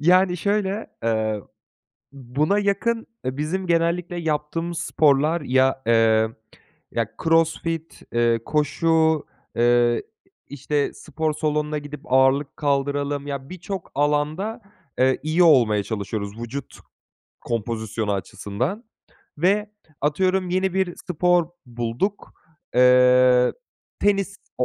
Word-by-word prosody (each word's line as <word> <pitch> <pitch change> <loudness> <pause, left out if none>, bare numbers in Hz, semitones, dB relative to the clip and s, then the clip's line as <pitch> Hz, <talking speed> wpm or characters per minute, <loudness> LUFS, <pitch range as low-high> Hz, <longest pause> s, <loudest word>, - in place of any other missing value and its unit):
Yani, 180 +3 +4
şöyle, 200 +2 -1 0.2
eee, 110 -2 0 0.7
buna 140 +9 0
yakın, 215 +3 0 0.2
eee, 130 +1 -3
bizim 180 +5 -2
genellikle 170 +1 0
yaptığımız 165 +1 -2
sporlar 155 +2 +2
ya, 130 0 +2
eee, 110 -1 +4 0.6
ya, 115 -2 -1 0.2
CrossFit 165 0 0
eee, 120 -1 +2
koşu, 160 +1 +2 0.3
eee, 120 0 +3 0.4
işte, 145 +1 -2
spor 155 +1 -3
salonuna 150 0 -1
gidip 145 -1 -8
ağırlık 135 +2 +3
kaldıralım. 145 0 -1
Ya, 140 -1 -5
birçok 185 0 -7
alanda, 150 - 0 0.4
eee, 130 0 +3
iyi 160 +3 +3
olmaya 120 -10 +5
çalışıyoruz. 100 0 -4
Vücut 120 +4 -7 0.6
kompozisyonu 110 -2 -3
açısından 120 - -4 0.5
ve 205 +5 +2 0.3
atıyorum 185 +5 +1
yeni 185 0 0
bir 190 -2 0
spor 175 0 +2 0.2
bulduk, 120 - -3 0.4
eee, 125 0 +5 0.5
tenis 200 -1 +1 0.2
o 125 - +2
150 Hz, 100 wpm, -23 LUFS, 125-175 Hz, 0.7 s, olmaya